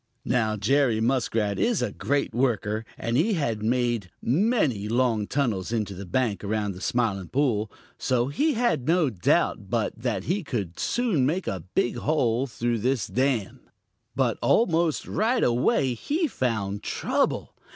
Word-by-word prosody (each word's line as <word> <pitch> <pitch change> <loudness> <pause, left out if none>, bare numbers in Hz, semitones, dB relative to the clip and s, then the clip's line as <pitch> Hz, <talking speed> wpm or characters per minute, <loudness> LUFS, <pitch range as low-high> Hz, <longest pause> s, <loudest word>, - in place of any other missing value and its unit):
Now 110 -3 +1
Jerry 120 +2 +2
Muskrat 115 -4 0
is 235 -4 +1
a - - -1
great 140 -4 -1
worker, 110 -3 0
and 115 +1 -2
he 180 - +3
had 115 -10 -1
made 120 -3 0
many 145 - +1
long 115 -2 +1
tunnels 115 -8 -1
into 105 -4 -1
the 95 +1 -8
bank 105 -1 0
around 105 0 -1
the 90 0 -9
Smiling 100 -7 0
Pool, 115 - 0 0.3
so 125 -2 +1
he 295 - +1
had 235 - 0
no 165 -4 +3
doubt 90 -6 +1
but - - 0
that - - -2
he 185 +3 -1
could 100 - -4
soon 230 - +1
make 165 +8 0
a 95 -3 -2 0.4
hole 130 -3 +1
through 120 -1 -1
this 125 -1 0
dam. 130 -6 -1 0.6
But - - +1
almost 170 -7 +2
right 230 +4 +1
away 125 +1 +2
he 300 - -1
found 110 - -2
trouble. - - -1
120 Hz, 150 wpm, -26 LUFS, 110-145 Hz, 0.6 s, he